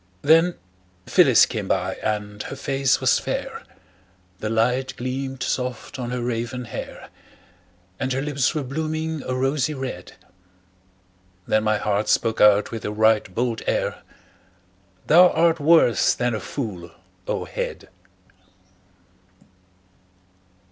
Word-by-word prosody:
Then 165 +3 +4 0.5
Phyllis - - +5
came - - -5
by, - - 0
and 105 -1 -3
her - - -6
face 135 -1 0
was - - +3
fair, - - -4 0.8
The 110 - -3
light 125 +4 0
gleamed 130 +1 -4
soft 125 0 -3
on 120 -1 -4
her 125 -1 -3
raven 120 +1 -3
hair; - - -8 0.9
And 130 - -2
her 130 +1 -1
lips 140 0 0
were 150 - -1
blooming 155 +3 -3
a 130 - -4
rosy 135 +3 0
red. 130 -10 -6 1.3
Then 110 0 +1
my 110 0 +2
heart 105 0 -1
spoke 115 -1 +1
out 105 0 +5
with 115 - -6
a 105 - -3
right 110 -2 +2
bold 120 -1 -1
air: - - -1 1.0
"Thou 180 +3 +7
art 165 0 +2
worse 155 -5 +4
than 120 -1 -1
a 110 - -2
fool, 100 -12 -6 0.4
O - - -2
head!" - - -5
125 Hz, 125 wpm, -23 LUFS, 110-140 Hz, 1.3 s, Thou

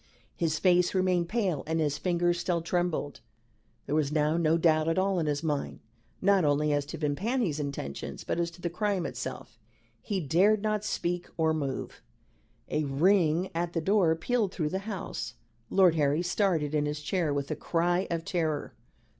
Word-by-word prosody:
His 160 -2 0
face 180 +3 +3
remained 180 -2 +1
pale 200 -10 0
and 160 +1 0
his 150 -2 0
fingers 175 -1 +1
still 175 -1 0
trembled. 175 -4 -1 0.7
There 140 - -3
was 150 -2 +1
now 150 0 +2
no 165 -1 +3
doubt 155 -2 +3
at 165 - +1
all 190 -1 +2
in 160 - -1
his 145 +1 -1
mind, 150 -3 -2 0.4
not 200 -1 +4
only 150 0 +2
as 145 -1 0
to 165 - -6
Vimpany's 165 - -1
intentions, 140 - -5
but - - -2
as 170 0 0
to 170 +1 -16
the 170 - -1
crime 195 -1 -1
itself. 130 -4 -6 0.4
He 200 -2 -2
dared 190 +7 +3
not 215 -1 0
speak 175 -4 -2
or 160 -1 +2
move. 140 -4 -4 0.7
A 155 - 0
ring 170 +4 +2
at 170 +1 -2
the 165 - 0
door 185 -2 +3
pealed 210 +4 0
through 155 -6 -2
the 190 - -2
house. 110 - -5 0.3
Lord 185 -4 +5
Harry 150 +1 +1
started 175 -5 +1
in 150 -1 +1
his 150 +1 -3
chair 165 0 0
with 140 -1 -2
a - - 0
cry 175 +2 0
of 165 -1 -2
terror. 160 -5 -1
165 Hz, 180 wpm, -29 LUFS, 150-185 Hz, 0.7 s, Lord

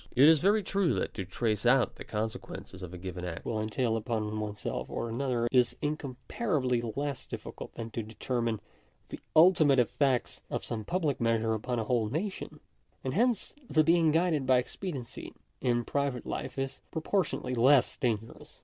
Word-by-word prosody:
It 135 +4 +8
is 160 -1 +7
very 205 +5 +3
true, 195 -2 +1
that - - -2
to 95 - -4
trace 105 +2 -1
out 125 +1 +4
the - - -7
consequences 105 -3 -5
a 90 - -5
given 90 0 -6
act 85 -2 -5
will 110 -2 -1
entail 115 +2 0
upon 110 -1 -2
oneself 105 -1 -4
or 115 - -3
another, 120 0 0
is 125 -2 +4
incomparably 140 - -1
less 135 +4 -3
difficult - - -8
than 115 -1 -6
to 115 - -3
deter 115 +3 -3
mine 115 -2 0 0.5
the - - -7 0.2
ultimate 155 -4 +6
effects 125 +1 +1
of - - -3
some 110 -2 -4
public 165 -8 0
measure 115 -1 +2
upon 120 +3 -2
a 115 - 0
whole 110 -1 +1
nation; 185 - -4 0.4
and 130 - -2
hence 235 +2 +1 0.2
the 155 - +4
being 165 -1 +4
guided 160 -4 +2
by 130 - +6
expediency 130 -1 -5 0.3
in 120 -2 +1
private 140 -4 -1
life - - -4
is 135 0 -3
proportionably 160 -6 -1
less 125 +2 +5
dangerous. 115 -2 -3
125 Hz, 165 wpm, -30 LUFS, 115-150 Hz, 0.5 s, It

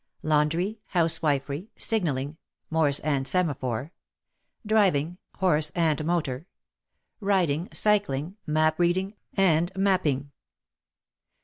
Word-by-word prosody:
Laundry, 160 +8 +1
House 165 -3 +2
wifery, 145 +3 -1
Signalling 150 -9 0 0.3
(Morse 150 -3 +2
and 140 -3 -1
Semaphore), 140 -6 -1 0.7
Driving 180 -6 +2 0.2
(horse 155 -5 +2
and 160 -3 +1
motor), 155 -3 -2 0.7
Riding, 180 -6 0
Cycling, 190 -6 +1
Map 155 +1 +1
reading 185 +3 +1 0.2
and 175 -3 +3
making. 170 -8 0
160 Hz, 90 wpm, -26 LUFS, 145-185 Hz, 0.7 s, and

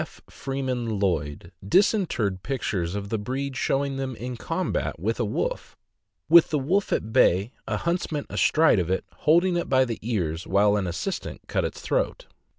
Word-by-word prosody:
Freeman 130 -5 -3
Lloyd 80 -7 -2
disinterred 120 - +2
pictures 100 -9 -2
of 100 -1 -4
the 110 - -1
breed 135 +5 -3
showing 135 0 0
them 135 -2 -3
in 125 +2 -5
combat 115 - -2
with 110 +7 -1
a 120 - +1
wolf, 105 - -3 0.5
with 165 +2 +7
the 155 - +1
wolf 180 +9 0
at 110 +1 -1
bay, 100 -3 +4 0.2
a - - -1
huntsman 170 -4 -2
astride 155 -9 +3
of 90 -1 -1
it, 95 - -1 0.2
holding 175 +2 +4
it 170 - -3
by 130 -1 +4
the 115 -3 -4
ears 90 -8 -2
while 100 +1 +3
an 100 -3 -1
assistant 95 - -4
cut - - 0
its - - -4
throat. - - -1
125 Hz, 165 wpm, -25 LUFS, 100-145 Hz, 0.5 s, with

